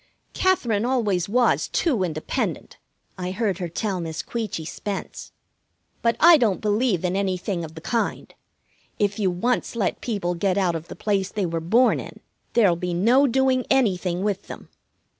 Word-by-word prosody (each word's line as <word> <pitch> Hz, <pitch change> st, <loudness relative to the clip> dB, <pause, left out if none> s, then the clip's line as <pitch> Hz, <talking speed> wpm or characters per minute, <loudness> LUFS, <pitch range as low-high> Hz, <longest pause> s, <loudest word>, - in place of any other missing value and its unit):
"Katherine 240 Hz, -, +1 dB
always 210 Hz, -8 st, 0 dB
was 245 Hz, +3 st, +2 dB
too 260 Hz, -, 0 dB
independent," 155 Hz, -3 st, -3 dB, 0.4 s
I 180 Hz, 0 st, -3 dB
heard 195 Hz, -1 st, -1 dB
her 175 Hz, -2 st, -3 dB
tell 190 Hz, +2 st, -2 dB
Miss 160 Hz, -2 st, -4 dB
Queechy 215 Hz, -9 st, -4 dB
Spence. 200 Hz, +4 st, -6 dB, 0.7 s
"But 230 Hz, -1 st, +2 dB
I 335 Hz, 0 st, +8 dB
don't 220 Hz, -8 st, +1 dB
believe 210 Hz, -3 st, +1 dB
in 180 Hz, +1 st, 0 dB
anything 190 Hz, -2 st, -1 dB
of 160 Hz, 0 st, -9 dB
the 160 Hz, -, -9 dB
kind. 230 Hz, +7 st, -2 dB, 0.6 s
If 205 Hz, 0 st, 0 dB
you 195 Hz, -3 st, +2 dB
once 235 Hz, +8 st, -1 dB
let 205 Hz, -6 st, -1 dB
people 200 Hz, -7 st, -2 dB
get 185 Hz, +2 st, 0 dB
out 185 Hz, -3 st, +2 dB
of 165 Hz, 0 st, -5 dB
the -, -, -8 dB
place 195 Hz, -2 st, -1 dB
they 205 Hz, -3 st, -1 dB
were 165 Hz, -1 st, -2 dB
born 230 Hz, +10 st, +3 dB
in, -, -, -9 dB, 0.3 s
there'll 205 Hz, -7 st, +4 dB
be 175 Hz, 0 st, -3 dB
no 245 Hz, +10 st, +4 dB
doing 260 Hz, 0 st, +2 dB
anything 190 Hz, -8 st, +1 dB
with 205 Hz, -2 st, -2 dB
them. -, -, -10 dB
200 Hz, 165 wpm, -23 LUFS, 180-235 Hz, 0.7 s, I